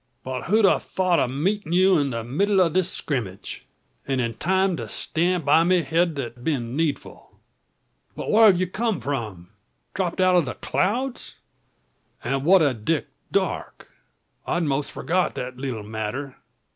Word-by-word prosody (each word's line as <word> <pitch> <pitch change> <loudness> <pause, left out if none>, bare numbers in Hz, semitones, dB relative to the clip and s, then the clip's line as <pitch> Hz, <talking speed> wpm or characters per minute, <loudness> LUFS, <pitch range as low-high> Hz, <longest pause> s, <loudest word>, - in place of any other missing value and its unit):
But 130 -1 -5
who'd 210 +3 +4
a - - +4
thought 185 -2 0
o' - - +2
meeting 170 +7 -1
ye 185 +1 +5
in 165 -8 +3
the 115 -2 -3
middle 190 - +1
of 170 -4 +3
the 185 - +4
skrimmage! 120 - -5 0.4
And 135 -1 0
in 115 -2 -1
time 190 +4 +1
to - - -6
stan' 175 +1 -1
by 150 +3 +5
me 180 0 +3
hed 165 +3 +1
that 120 -3 -6
been 125 -5 -2
needful. 155 -2 -3 0.8
But - - -4
whar 220 +1 +7
hev 185 -4 +5
ye 185 - +2
come 210 0 -2
from? 110 -10 -4 0.4
Dropt 185 -3 -2
out 185 0 +4
o' 175 - +6
the 130 -8 -5
clouds? 240 - -2 0.9
An' 135 +2 -1
what 185 0 +6
o' 140 -3 +2
Dick 130 +7 -2 0.2
Darke? - - -2 0.6
I'd 175 - 0
most 145 -1 -1
forgot 180 +1 -1
that 125 0 -5
leetle 130 -6 -4
matter. 110 +6 -5
160 Hz, 165 wpm, -24 LUFS, 130-185 Hz, 0.9 s, whar